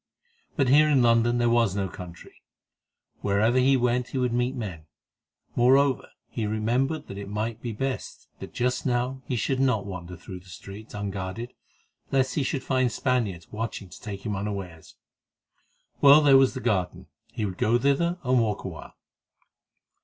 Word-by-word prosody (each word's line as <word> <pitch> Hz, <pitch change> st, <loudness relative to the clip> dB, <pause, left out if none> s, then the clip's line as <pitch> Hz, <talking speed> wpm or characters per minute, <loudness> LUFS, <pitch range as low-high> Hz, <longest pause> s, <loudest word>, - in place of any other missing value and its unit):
But 135 Hz, -4 st, +2 dB
here 150 Hz, +3 st, +6 dB
in 135 Hz, -4 st, +4 dB
London 120 Hz, 0 st, +3 dB
was 115 Hz, -5 st, +2 dB
no 100 Hz, -1 st, -1 dB
country, 90 Hz, -1 st, -11 dB, 0.8 s
wherever 110 Hz, +5 st, +2 dB
he 135 Hz, +1 st, +4 dB
went 125 Hz, 0 st, +1 dB
he -, -, -5 dB
would 125 Hz, -2 st, 0 dB
meet 125 Hz, +2 st, 0 dB
men; 90 Hz, -10 st, -6 dB, 0.7 s
moreover, 135 Hz, +2 st, +3 dB, 0.2 s
he 110 Hz, -3 st, -3 dB
remembered 120 Hz, +8 st, 0 dB
that 100 Hz, -, -8 dB
it 100 Hz, 0 st, -7 dB
might 110 Hz, +2 st, -3 dB
be 120 Hz, -, -4 dB
best 130 Hz, +4 st, -4 dB
that -, -, -8 dB
just 125 Hz, +1 st, -1 dB
now 125 Hz, +1 st, -1 dB
he 125 Hz, -, -1 dB
should 130 Hz, +3 st, 0 dB
not 125 Hz, -7 st, +2 dB
wander 90 Hz, -2 st, -7 dB
through 90 Hz, +2 st, -9 dB
the 90 Hz, +1 st, -18 dB
streets 100 Hz, +5 st, -10 dB
unguarded, 100 Hz, +3 st, -5 dB, 0.6 s
lest 130 Hz, -1 st, +2 dB
he 150 Hz, -, 0 dB
should 135 Hz, 0 st, -2 dB
find 130 Hz, -2 st, +1 dB
Spaniards 110 Hz, -, -1 dB
watching 105 Hz, -3 st, -5 dB
to -, -, -13 dB
take 100 Hz, -1 st, -7 dB
him 105 Hz, -2 st, -2 dB
unawares. 95 Hz, -5 st, -6 dB, 1.1 s
Well, 145 Hz, +2 st, +8 dB
there 140 Hz, -2 st, +6 dB
was 135 Hz, 0 st, +5 dB
the 130 Hz, -, -4 dB
garden; 90 Hz, -4 st, -1 dB, 0.3 s
he 110 Hz, -, -3 dB
would 95 Hz, -2 st, -5 dB
go 115 Hz, +2 st, +3 dB
thither, 140 Hz, +7 st, +1 dB
and 125 Hz, 0 st, +3 dB
walk 110 Hz, -3 st, -1 dB
a -, -, -4 dB
while. -, -, -11 dB
120 Hz, 170 wpm, -26 LUFS, 100-130 Hz, 1.1 s, Well